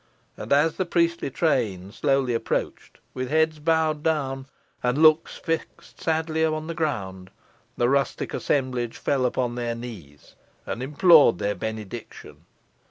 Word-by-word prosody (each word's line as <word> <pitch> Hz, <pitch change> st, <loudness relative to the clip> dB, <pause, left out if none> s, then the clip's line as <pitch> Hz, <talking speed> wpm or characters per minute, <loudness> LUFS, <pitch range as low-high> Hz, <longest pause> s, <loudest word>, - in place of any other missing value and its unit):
And -, -, -9 dB
as 150 Hz, +3 st, +3 dB
the 185 Hz, -, 0 dB
priestly 170 Hz, -3 st, +1 dB
train 115 Hz, -, 0 dB
slowly 135 Hz, -1 st, +1 dB
approached, 115 Hz, -1 st, -3 dB, 0.2 s
with 130 Hz, 0 st, -4 dB
heads 160 Hz, +1 st, +2 dB
bowed 160 Hz, -1 st, +1 dB
down, 135 Hz, -4 st, -1 dB, 0.3 s
and 125 Hz, +2 st, 0 dB
looks 155 Hz, +1 st, +4 dB
fixed 165 Hz, -1 st, -5 dB
sadly 160 Hz, 0 st, 0 dB
upon 155 Hz, -1 st, 0 dB
the 165 Hz, -, -4 dB
ground, 95 Hz, -, -3 dB, 0.5 s
the 120 Hz, -, +2 dB
rustic 140 Hz, +1 st, 0 dB
assemblage 125 Hz, -4 st, -1 dB
fell 130 Hz, -3 st, +1 dB
upon 125 Hz, -1 st, -1 dB
their 120 Hz, -1 st, -3 dB
knees, 95 Hz, -, -10 dB, 0.3 s
and 115 Hz, -, -4 dB
implored 150 Hz, -, +5 dB
their 100 Hz, +3 st, -1 dB
benediction. 110 Hz, +2 st, -8 dB
135 Hz, 135 wpm, -25 LUFS, 120-160 Hz, 0.5 s, implored